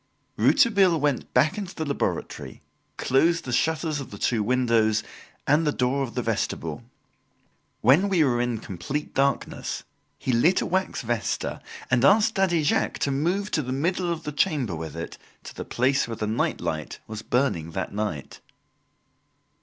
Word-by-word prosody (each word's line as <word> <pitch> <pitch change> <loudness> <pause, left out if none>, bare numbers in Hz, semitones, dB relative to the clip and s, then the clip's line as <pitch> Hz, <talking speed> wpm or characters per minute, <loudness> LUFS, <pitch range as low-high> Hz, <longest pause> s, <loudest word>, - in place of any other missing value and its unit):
Rouletabille 200 - +4
went 145 -3 -1
back 150 +10 +3
into 190 -3 -6
the 160 - -3
laboratory, 140 -1 -3 0.3
closed 165 +6 +2
the 130 - -4
shutters 160 +2 0
of 135 - -7
the 100 - -9
two 115 +1 +1
windows 115 -2 +2 0.4
and 150 +3 +3
the - - +3
door 130 +1 0
of 130 -3 -4
the - - -1
vestibule. - - -2 1.0
When 145 - +5
we 180 -5 +4
were 120 -4 +2
in 120 -2 -1
complete 110 - -5
darkness, 140 +1 -1 0.3
he 130 - -2
lit 140 +10 +4
a - - -1
wax 190 -6 -1
vesta, 115 -1 -2 0.3
and 125 0 +3
asked 215 +7 +5
Daddy 180 -5 +2
Jacques 145 - +1
to 140 - 0
move 180 +9 0
to 155 - +1
the 130 -2 -5
middle 170 +6 0
of 165 - -4
the 150 - -4
chamber 140 - 0
with 80 0 -6
it 85 - -6 0.2
to - - -9
the - - -6
place 130 +2 +1
where 115 - -4
the 110 - -2
night 110 +2 0
light 80 -2 -3
was 110 0 -7
burning 115 - 0
that - - -3
night. 100 -10 -4
135 Hz, 170 wpm, -25 LUFS, 115-165 Hz, 1.0 s, When